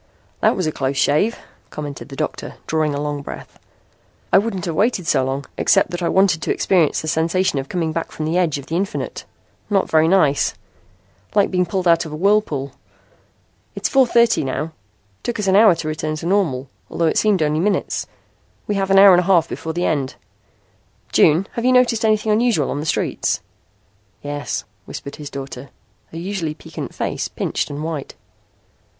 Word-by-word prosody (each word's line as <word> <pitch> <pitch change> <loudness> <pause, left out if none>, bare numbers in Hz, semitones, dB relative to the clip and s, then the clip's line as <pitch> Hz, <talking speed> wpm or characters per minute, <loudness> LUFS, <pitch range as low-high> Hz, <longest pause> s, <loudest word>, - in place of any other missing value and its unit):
"That - - +3
was 185 - -1
a 155 - 0
close 135 -1 -2
shave," 155 - +2 0.3
commented 145 -2 -7
the 135 - -8
doctor, 155 +2 -4
drawing 155 -2 0
a - - -2
long 145 -1 -3
breath. - - -10 0.7
"I - - +8
wouldn't 200 -4 -3
have 170 - -2
waited 200 0 +1
so 145 - +2
long, 135 +2 -3
except - - +3
that 175 0 -4
I 170 - 0
wanted 190 -4 +3
to - - -1
experience 175 -6 +2
the 155 - -6
sensation 165 0 +1
of 135 - -6
coming 165 -3 -1
back 165 +1 -4
from 155 - -4
the 160 +2 -1
edge 175 -5 +1
of 140 - -8
the 165 - -4
infinite. 195 +4 -3 0.4
Not 195 -2 +1
very 160 0 +4
nice! 160 -6 +3 0.8
Like 205 -2 +3
being 180 -1 +1
pulled 185 0 -1
out 170 0 +4
of 160 - -8
a - - -5
whirlpool. 165 -7 +1 1.0
It's - - -1
4:30 235 - +4
now. 145 +4 -3 0.5
Took 240 - -3
us 210 - -1
an 190 0 +3
hour 210 -3 +7
to 165 -1 -5
return 155 0 -2
to 155 - -7
normal, 170 -9 0 0.2
although 170 - -1
it 160 - +2
seemed 205 -6 +2
only 150 +1 +1
minutes. 200 +4 -1 0.6
We 210 - -1
have 195 -1 -1
an 195 - +4
hour 195 0 +9
and 175 - +6
a - - +1
half 170 -4 +4
before 160 - -5
the 175 +2 -1
end. 140 -4 -1 1.0
June, 165 +4 +4
have 235 - -4
you 255 - +4
noticed 245 -3 +3
anything 215 0 +2
unusual 215 - +2
on 145 - -3
the 150 - -4
streets?" - - 0 0.8
"Yes," 145 -8 -3 0.2
whispered 140 - -8
his 150 -2 -7
daughter, 135 -1 -7 0.4
her 165 - -8
usually 170 -3 -3
piquant - - -8
face - - -2
pinched - - -3
and 145 +1 -5
white. 160 -3 -5
165 Hz, 190 wpm, -20 LUFS, 150-195 Hz, 1.0 s, hour